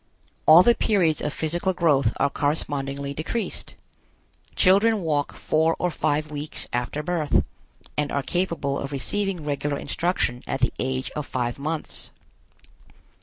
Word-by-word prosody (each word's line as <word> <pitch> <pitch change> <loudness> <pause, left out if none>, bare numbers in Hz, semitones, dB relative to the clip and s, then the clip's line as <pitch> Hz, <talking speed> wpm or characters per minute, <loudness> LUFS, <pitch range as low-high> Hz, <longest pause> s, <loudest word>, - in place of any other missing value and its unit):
All 160 +3 +9
the 240 - +6
periods 180 -10 +2
of 150 - -1
physical 175 +5 -1
growth 145 -9 +3
are 140 - +1
correspondingly 140 -1 -1
decreased. 160 +10 -4 0.8
Children 205 +3 +4
walk 145 -3 -1
four 160 +1 +1
or 180 - 0
five 155 0 -1
weeks 150 +1 -2
after 125 +5 -2
birth, 160 -3 +1 0.5
and 150 -1 -1
are 140 - -1
capable 170 -5 -1
of 140 - -5
receiving 185 +4 -2
regular 145 0 -1
instruction 150 -10 -1
at 135 - -2
the 125 - +2
age 130 0 -2
of 150 -1 -5
five 120 0 -2
months. 155 +2 -3
150 Hz, 135 wpm, -24 LUFS, 140-175 Hz, 0.8 s, All